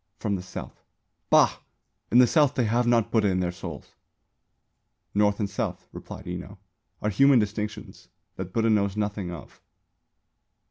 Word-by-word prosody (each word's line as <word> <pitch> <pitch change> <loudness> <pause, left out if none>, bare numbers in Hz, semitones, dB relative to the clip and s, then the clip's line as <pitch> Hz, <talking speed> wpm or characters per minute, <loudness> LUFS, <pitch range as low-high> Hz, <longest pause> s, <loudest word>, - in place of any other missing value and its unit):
"From 100 -2 -1
the 90 - -4
South." 90 - -9 0.5
"Bah! - - +5 0.5
In 120 - +5
the 125 - +8
South 145 +1 +3
they 125 - +2
have 120 +2 +1
not 120 -2 +2
Buddha 110 -3 +3
in 95 -1 +1
their 90 -1 0
souls." 90 - -9 1.2
"North 105 0 +2
and 105 - 0
South," 100 - -4
replied - - -9
Enō, 90 +1 -7 0.5
"are 105 - +1
human 135 +4 +5
distinctions 105 -1 -3 0.3
that 95 -1 -6
Buddha 115 +2 +2
knows 100 -1 +1
nothing 105 -3 -2
of." 85 -4 -10
105 Hz, 150 wpm, -26 LUFS, 95-115 Hz, 1.2 s, the